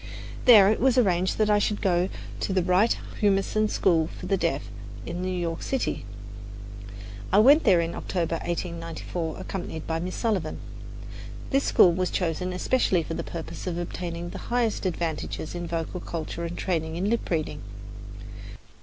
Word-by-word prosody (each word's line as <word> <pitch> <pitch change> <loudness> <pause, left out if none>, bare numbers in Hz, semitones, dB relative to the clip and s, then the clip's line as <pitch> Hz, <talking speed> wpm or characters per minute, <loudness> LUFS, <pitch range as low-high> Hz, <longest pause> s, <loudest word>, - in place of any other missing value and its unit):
There 210 -5 +8
it 220 - 0
was 260 0 +3
arranged 185 -6 +2
that 215 -1 +3
I 205 - +4
should 205 0 0
go 180 -2 +1 0.3
to - - -2
the 185 -2 +2
Wright 185 +6 +3 0.2
Humason 205 +1 +2
School 165 -6 +2
for 180 - -9
the 195 +2 +2
Deaf 165 -6 0 0.4
in 175 - -4
New 185 - -2
York 175 -3 -2
City. 265 - -2 1.3
I 190 - +4
went 280 +9 +7
there 190 -6 +6
in 165 0 -2
October, 170 -2 -2
1894, 165 -1 -4
accompanied 175 -4 -5
by 160 0 -1
Miss 180 +2 -4
Sullivan. 195 -9 -1 0.9
This 275 +1 +2
school 175 - +6
was 185 +1 0
chosen 180 +1 -1
especially 185 -2 +1
for 165 - -5
the 170 +1 -3
purpose 165 +3 -7
of 175 -2 -2
obtaining 175 0 -4
the - - -7
highest 235 -5 +1
advantages 160 -2 -3
in 175 -1 -4
vocal 165 +2 -3
culture 170 0 -5
and 170 +1 -5
training 160 -3 -1
in 185 +4 -1
lip 230 +2 -1
reading. 160 -3 -2
180 Hz, 165 wpm, -26 LUFS, 165-200 Hz, 1.3 s, There